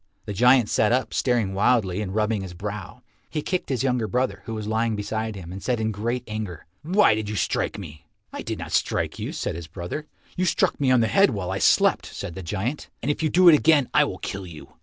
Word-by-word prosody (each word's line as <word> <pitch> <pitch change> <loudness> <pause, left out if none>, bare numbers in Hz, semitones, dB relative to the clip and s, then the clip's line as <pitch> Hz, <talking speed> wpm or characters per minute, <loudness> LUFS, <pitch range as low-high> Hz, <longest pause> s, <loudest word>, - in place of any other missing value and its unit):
The 105 - -4
giant 125 +2 +5
sat 105 +1 +2
up 125 -3 0
staring 120 -7 +1
wildly 100 -2 +2
and 95 -1 -4
rubbing 110 -1 +1
his 95 -2 -8
brow. 100 0 -7 0.3
He 150 - -3
kicked 185 -1 -2
his 130 -3 0
younger 125 -4 +1
brother, 120 -6 -1
who 115 - -5
was 110 -1 -5
lying 110 +1 0
beside 110 +1 -3
him, 90 -3 -8
and 95 +1 -7
said 125 -3 -1
in 110 0 0
great 115 +4 -2
anger, 105 -6 -5 0.2
"Why 180 - +4
did 105 -1 -3
you 105 - -3
strike - - -1
me?" 80 -7 -10 0.3
"I - - -5
did - - -4
not - - -7
strike - - 0
you," - - -3
said - - -3
his 85 -1 -7
brother. 90 - -6 0.3
"You 185 - 0
struck 170 - +1
me 135 - +3
on 130 -2 +5
the 115 - +2
head 195 - +4
while 100 -5 -3
I - - -2
slept," - - +3
said - - -7
the 95 - -7
giant, 105 - -3
"and 145 - +1
if 145 - -4
you 155 - +1
do 180 +4 +5
it 170 - +10
again 150 -3 +4
I - - +5
will - - -5
kill 100 -2 -5
you." 80 -3 -11
110 Hz, 245 wpm, -24 LUFS, 100-125 Hz, 0.3 s, it